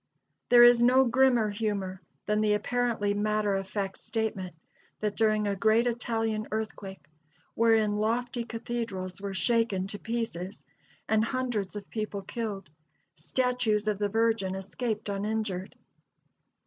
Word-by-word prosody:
There 240 Hz, 0 st, +8 dB
is 240 Hz, 0 st, +7 dB
no 255 Hz, +2 st, +5 dB
grimmer 245 Hz, -3 st, +3 dB
humor 200 Hz, -3 st, -3 dB, 0.2 s
than 210 Hz, 0 st, +1 dB
the 210 Hz, -1 st, +3 dB
apparently 235 Hz, -2 st, 0 dB
matter 210 Hz, 0 st, +1 dB
of 195 Hz, 0 st, -2 dB
fact 195 Hz, -2 st, -3 dB
statement 200 Hz, -6 st, -3 dB, 0.4 s
that 210 Hz, -1 st, -2 dB
during 215 Hz, -1 st, +2 dB
a 200 Hz, -, 0 dB
great 220 Hz, +4 st, +3 dB
Italian 225 Hz, -2 st, -1 dB
earthquake, 215 Hz, -3 st, -5 dB, 0.5 s
wherein 220 Hz, -2 st, +3 dB
lofty 235 Hz, +3 st, -1 dB
cathedrals 225 Hz, -6 st, -5 dB
were 200 Hz, -1 st, -4 dB
shaken 225 Hz, -3 st, +1 dB
to 205 Hz, +1 st, -7 dB
pieces 220 Hz, -5 st, -4 dB, 0.4 s
and 220 Hz, 0 st, +3 dB
hundreds 230 Hz, -5 st, -2 dB
of 205 Hz, -1 st, -7 dB
people 215 Hz, -3 st, -3 dB
killed, 200 Hz, -7 st, -5 dB, 0.4 s
statues 235 Hz, -, 0 dB
of 210 Hz, -2 st, 0 dB
the 205 Hz, -1 st, 0 dB
Virgin 225 Hz, -3 st, +1 dB
escaped 215 Hz, +3 st, -4 dB
uninjured. 200 Hz, -2 st, -3 dB
215 Hz, 130 wpm, -28 LUFS, 200-230 Hz, 0.5 s, There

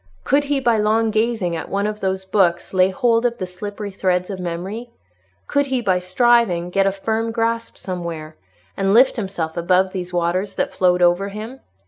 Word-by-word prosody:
Could 285 Hz, +2 st, +2 dB
he 285 Hz, -1 st, 0 dB
by 235 Hz, -4 st, +2 dB
long 220 Hz, +1 st, +2 dB
gazing 220 Hz, -5 st, 0 dB
at 160 Hz, -, -5 dB
one 200 Hz, +1 st, -1 dB
of 210 Hz, 0 st, -3 dB
those 190 Hz, -1 st, -2 dB
books 185 Hz, -3 st, +1 dB
lay 185 Hz, 0 st, +4 dB
hold 230 Hz, +3 st, +2 dB
of 240 Hz, -1 st, 0 dB
the 185 Hz, -, -3 dB
slippery 205 Hz, +3 st, -7 dB
threads 185 Hz, 0 st, 0 dB
of 190 Hz, -, -6 dB
memory? 185 Hz, +7 st, -5 dB, 0.6 s
Could 285 Hz, 0 st, +1 dB
he, 265 Hz, -1 st, 0 dB
by 190 Hz, -6 st, +1 dB
striving, 185 Hz, -2 st, +2 dB
get 195 Hz, +1 st, +2 dB
a -, -, +3 dB
firm 220 Hz, +3 st, -2 dB
grasp 230 Hz, 0 st, -2 dB
somewhere, 170 Hz, -4 st, -6 dB, 0.4 s
and 195 Hz, +1 st, +1 dB
lift 255 Hz, +3 st, +6 dB
himself 190 Hz, -8 st, -3 dB
above 185 Hz, +2 st, +2 dB
these 180 Hz, -2 st, -5 dB
waters 180 Hz, +3 st, -1 dB
that -, -, -1 dB
flowed 180 Hz, -1 st, +2 dB
over 175 Hz, +3 st, +3 dB
him? 220 Hz, +6 st, -8 dB
195 Hz, 185 wpm, -20 LUFS, 180-225 Hz, 0.6 s, lift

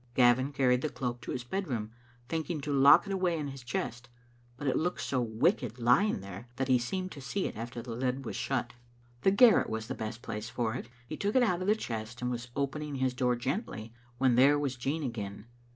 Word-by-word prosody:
Gavin 130 Hz, +2 st, +4 dB
carried 130 Hz, -3 st, +3 dB
the 155 Hz, -, -1 dB
cloak 125 Hz, -3 st, -4 dB
to -, -, -6 dB
his 125 Hz, -, -3 dB
bed 190 Hz, +9 st, -3 dB
room, 110 Hz, -4 st, -3 dB, 0.4 s
thinking 160 Hz, +1 st, -2 dB
to 145 Hz, +1 st, -2 dB
lock 140 Hz, +6 st, +7 dB
it 200 Hz, -, -3 dB
away 180 Hz, -3 st, +1 dB
in 150 Hz, -2 st, -3 dB
his 135 Hz, -1 st, -8 dB
chest, 120 Hz, 0 st, -4 dB, 0.5 s
but 145 Hz, -, -6 dB
it 135 Hz, -, +2 dB
looked 175 Hz, +3 st, 0 dB
so 130 Hz, -2 st, 0 dB
wicked 120 Hz, -, +1 dB
lying 125 Hz, -, +3 dB
there 100 Hz, +4 st, -9 dB
that 135 Hz, 0 st, -1 dB
he 125 Hz, -1 st, +5 dB
seemed 185 Hz, +10 st, -3 dB
to 140 Hz, -, -9 dB
see 185 Hz, +9 st, -2 dB
it -, -, -4 dB
after 120 Hz, +2 st, -6 dB
the 120 Hz, -, -7 dB
lid 130 Hz, +2 st, -2 dB
was -, -, -4 dB
shut. 125 Hz, -2 st, -2 dB, 0.5 s
The -, -, +5 dB
garret 215 Hz, +3 st, +6 dB
was 110 Hz, 0 st, -3 dB
the -, -, -4 dB
best 110 Hz, +2 st, -6 dB
place 110 Hz, 0 st, -5 dB
for 115 Hz, -3 st, -1 dB
it. 120 Hz, -, -6 dB, 0.2 s
He 155 Hz, -, -6 dB
took 205 Hz, +3 st, -1 dB
it 255 Hz, -, +6 dB
out 180 Hz, -6 st, +1 dB
of 185 Hz, -, -2 dB
the 210 Hz, -, +5 dB
chest 115 Hz, -, -5 dB
and 125 Hz, 0 st, -1 dB
was 120 Hz, 0 st, -4 dB
opening 140 Hz, +1 st, -2 dB
his 130 Hz, -1 st, 0 dB
door 125 Hz, 0 st, +1 dB
gently, 120 Hz, -, -4 dB, 0.2 s
when 130 Hz, -1 st, +3 dB
there 135 Hz, +4 st, +6 dB
was 140 Hz, -3 st, -1 dB
Jean 140 Hz, +6 st, -2 dB
again. 105 Hz, -5 st, -5 dB
130 Hz, 230 wpm, -31 LUFS, 120-150 Hz, 0.5 s, lock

